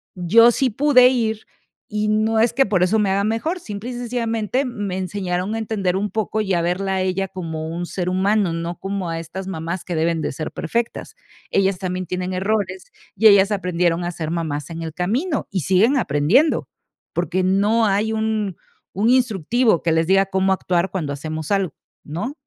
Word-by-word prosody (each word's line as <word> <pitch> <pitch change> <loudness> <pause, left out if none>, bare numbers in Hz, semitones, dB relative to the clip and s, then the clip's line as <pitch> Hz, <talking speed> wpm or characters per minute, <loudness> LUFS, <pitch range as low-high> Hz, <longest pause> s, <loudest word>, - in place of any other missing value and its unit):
Yo 220 +7 +6
sí 260 +2 +1
pude 255 0 +5
ir, 220 -4 -1 0.4
y 210 0 -1
no 215 +1 +2
es 230 +1 +3
que 270 +2 +3
por 195 -3 +1
eso 205 +5 +2
me 200 -2 +1
haga 200 +1 +1
mejor, 270 - -1
simple 215 -1 -6
y - - -5
sencillamente 240 +1 -1
me 205 -6 -4
enseñaron 185 +1 -2
a 225 - -2
entender 200 -5 -1
un 205 +1 -1
poco, 220 0 -1
y 195 -3 -1
a 170 - +1
verla 190 +3 -1
a 190 - 0
ella 190 +1 -1
como 160 -4 -5
un 175 +1 -4
ser 180 0 -3
humano, 190 0 +1
no 170 +1 -4
como 195 -2 -3
a 165 0 -3
estas 175 +4 -7
mamás 170 0 -4
que 180 - -4
deben 165 0 0
de - - -2
ser 155 - -5
perfectas. 230 +8 -3 0.4
Ellas 195 -1 +2
también 185 -1 -3
tienen 185 0 -3
errores, 190 -1 -2 0.2
y 220 +3 +5
ellas 200 0 +6
aprendieron 180 -3 0
a 175 - -2
ser 160 -2 -5
mamás 155 -4 -3
en 165 - -6
el 160 - -5
camino 255 - -1
y 195 - -1
siguen 205 - +3
aprendiendo. 185 - +2 0.5
Porque 185 0 -1
no 205 +5 +2
hay 210 +3 +1
un 220 -3 -1 0.4
un 220 +4 +2
instructivo 240 -4 +2
que 170 - +1
les 160 +1 +2
diga 195 0 +4
cómo 190 0 +1
actuar 180 -1 0
cuando 160 -7 -3
hacemos 155 +2 -5
algo, 195 -4 +1 0.3
¿no? 175 - -4
195 Hz, 190 wpm, -21 LUFS, 175-220 Hz, 0.5 s, Yo